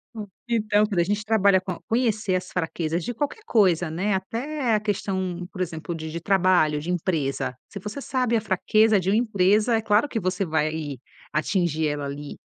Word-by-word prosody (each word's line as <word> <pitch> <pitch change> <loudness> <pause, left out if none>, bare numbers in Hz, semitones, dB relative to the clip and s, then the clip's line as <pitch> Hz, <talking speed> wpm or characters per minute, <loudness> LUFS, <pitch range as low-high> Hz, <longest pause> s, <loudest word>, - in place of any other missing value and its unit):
Hum, 215 -2 -6 0.2
então, 215 -2 +2
quando 200 -5 -1
a - - +5
gente 205 +4 -1
trabalha 200 -3 +4
com 185 -2 -5
conhecer 220 -5 +1
as 185 0 -3
fraquezas 165 -1 -2
de 245 - -3
qualquer 295 - -3
coisa, 180 - +3
né. 185 +6 -1
Até 235 +7 -2
a 210 - +2
questão, 190 -4 -2
por 185 - -6
exemplo, 170 0 -4
de 160 -1 -6
de 170 - -4
trabalho, 175 -5 +3
de 165 - -6
empresa. 155 -7 -1
Se 200 - -7
você 210 +8 -6
sabe 250 -3 0
a 220 - +2
fraqueza 215 +2 +3
de 185 - -1
uma 200 - +3
empresa, 215 0 +3
é 220 - -1
claro 215 +6 +2
que 230 - -2
você 185 0 -1
vai 155 -3 -1 0.3
atingir 160 -1 0
ela 145 -1 -2
ali. 145 +1 -6
190 Hz, 190 wpm, -24 LUFS, 170-215 Hz, 0.3 s, a